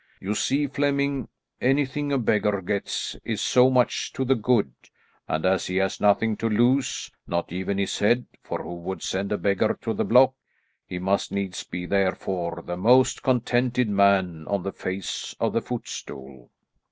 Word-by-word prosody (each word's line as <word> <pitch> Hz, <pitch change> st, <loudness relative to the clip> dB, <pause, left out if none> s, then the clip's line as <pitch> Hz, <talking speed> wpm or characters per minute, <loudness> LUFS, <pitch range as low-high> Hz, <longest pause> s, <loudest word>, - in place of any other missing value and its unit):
You 100 Hz, +2 st, -2 dB
see, 140 Hz, +7 st, +1 dB
Flemming, 140 Hz, -1 st, 0 dB, 0.3 s
anything 140 Hz, +2 st, +1 dB
a 140 Hz, -, +2 dB
beggar 105 Hz, -4 st, +1 dB
gets 100 Hz, +2 st, -2 dB
is -, -, -3 dB
so 125 Hz, +1 st, +4 dB
much 125 Hz, -2 st, +1 dB
to 130 Hz, -, -2 dB
the 135 Hz, -, +4 dB
good; 115 Hz, -, +1 dB, 0.5 s
and, 80 Hz, +2 st, -1 dB
as 95 Hz, 0 st, +2 dB
he 90 Hz, -, -3 dB
has 95 Hz, 0 st, 0 dB
nothing 105 Hz, +2 st, +3 dB
to 115 Hz, -, -1 dB
lose, 120 Hz, +5 st, +1 dB, 0.2 s
not 85 Hz, 0 st, -2 dB
even 95 Hz, +2 st, -2 dB
his 100 Hz, -1 st, -1 dB
head 120 Hz, +4 st, +3 dB, 0.2 s
for -, -, -5 dB
who 85 Hz, -, -6 dB
would 90 Hz, +2 st, -6 dB
send 95 Hz, +1 st, -2 dB
a 105 Hz, -, +1 dB
beggar 100 Hz, +2 st, +1 dB
to 115 Hz, -3 st, -1 dB
the -, -, -1 dB
block 130 Hz, +1 st, +5 dB, 0.5 s
he 90 Hz, -, -5 dB
must 95 Hz, +2 st, 0 dB
needs 100 Hz, -2 st, -3 dB
be 90 Hz, 0 st, -6 dB
therefore 90 Hz, -3 st, -1 dB
the 90 Hz, 0 st, -4 dB
most 125 Hz, +7 st, +4 dB
contented 125 Hz, -1 st, +1 dB
man 95 Hz, -5 st, +2 dB
on 100 Hz, -3 st, -1 dB
the 95 Hz, -, -4 dB
face 95 Hz, -1 st, -4 dB
of -, -, 0 dB
the -, -, +1 dB
footstool." 65 Hz, -2 st, -7 dB
100 Hz, 170 wpm, -25 LUFS, 95-125 Hz, 0.5 s, block